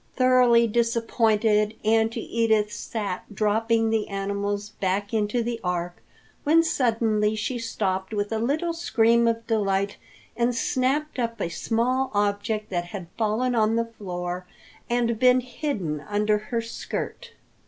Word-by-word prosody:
Thoroughly 250 -2 +5
disappointed, 225 -2 +2
Auntie 225 +1 +2
Edith 220 -2 +2
sat 205 -5 -4
dropping 225 +2 +2
the 220 -1 0
animals 200 +1 -2
back 200 +3 -1
into 220 +2 +1
the 235 0 -3
Ark 175 -1 -2 0.5
when 325 +3 +5
suddenly 225 -8 +1
she 230 +3 -2
stopped 190 -4 -2
with 205 -1 -2
a 220 - 0
little 305 +9 0
scream 235 -8 +3
of 230 0 0
delight 200 -3 0 0.4
and 240 +1 +1
snapped 265 +5 0
up 230 -1 -2
a 170 - -1
small 250 +8 0
object 205 +1 0
that 175 -1 -1
had 175 -1 -8
fallen 230 +3 0
on 220 -1 +2
the 230 0 +1
floor 180 -2 -4 0.4
and 235 -2 +1
been 250 0 +5
hidden 235 - -3
under 210 0 +1
her 230 -1 0
skirt. 465 - -6
225 Hz, 135 wpm, -25 LUFS, 205-235 Hz, 0.5 s, Thoroughly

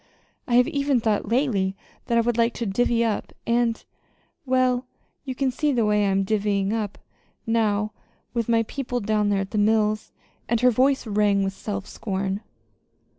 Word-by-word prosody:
I 240 - +1
have 245 0 +5
even 280 -2 +1
thought 220 -2 0
lately 225 -7 +1 0.3
that 235 - +2
I - - +5
would 240 +1 +1
still 230 0 +3
like 230 - -3
to 235 - -3
'divvy 235 +3 +1
up'; 220 -3 -2
and 235 -1 +1 0.6
well, 255 -1 +2 0.4
you 260 -2 -4
can 265 0 0
see 295 +4 0
the 240 -5 +2
way 210 0 +2
I 200 - +2
am 195 0 +2
'divvying 200 0 0
up' 215 -3 -3 0.5
now 215 -2 +1 0.4
with 235 -1 -1
my 230 -1 +3
people 245 +1 -3
down 210 -1 +1
there 200 -1 +1
at 195 - -6
the 215 - 0
mills!" 215 0 +1 0.4
And 235 0 +2
her 250 0 +5
voice 265 +4 +2
rang 205 -2 +2
with 195 0 -1
self 200 0 -5
scorn. 195 -1 -3
225 Hz, 180 wpm, -24 LUFS, 205-245 Hz, 0.6 s, have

